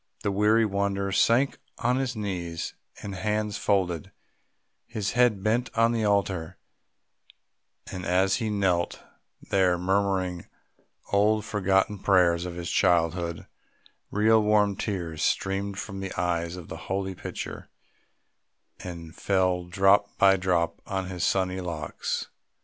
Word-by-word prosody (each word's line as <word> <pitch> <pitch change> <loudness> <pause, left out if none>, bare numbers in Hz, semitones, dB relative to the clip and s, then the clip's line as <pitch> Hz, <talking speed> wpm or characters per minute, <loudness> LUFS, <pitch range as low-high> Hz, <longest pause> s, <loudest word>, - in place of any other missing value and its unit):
The 100 - +1
weary 105 +3 +3
wanderer 100 -1 -1
sank 120 +7 +3 0.2
on 125 +2 +1
his 130 -2 -1
knees, 90 -6 -4 0.2
his 100 -2 -7
hands 105 -1 -1
folded, 90 -6 0 0.8
his 110 -4 -2
head 120 -5 +3
bent 115 +3 +1
on 115 0 +4
the 115 -2 0
altar, 95 -5 0 1.3
and 90 -1 -5
as 95 +2 +2
he 115 -3 -2
knelt 95 -4 0 0.5
there 95 -2 +3
murmuring 95 -1 0 0.7
old 105 +1 +3
forgotten 100 0 +1
prayers 90 -3 +3
of 90 -1 -5
his 85 -1 -4
childhood, 85 -1 +1 0.6
real 110 +2 +4
warm 105 -1 +3
tears 85 -7 -4
streamed 100 0 0
from 100 -1 -6
the 95 -1 -5
eyes 85 -1 -1
of 90 -3 -9
the - - -7
holy 95 0 -1
picture - - -7 1.1
and 85 -2 -8
fell 90 -2 +1
drop 95 +3 +3
by 95 0 +6
drop 90 -3 0
on 95 -1 -3
his 90 -2 -4
sunny 95 0 +1
locks. 80 -4 -4
95 Hz, 125 wpm, -27 LUFS, 90-105 Hz, 1.3 s, by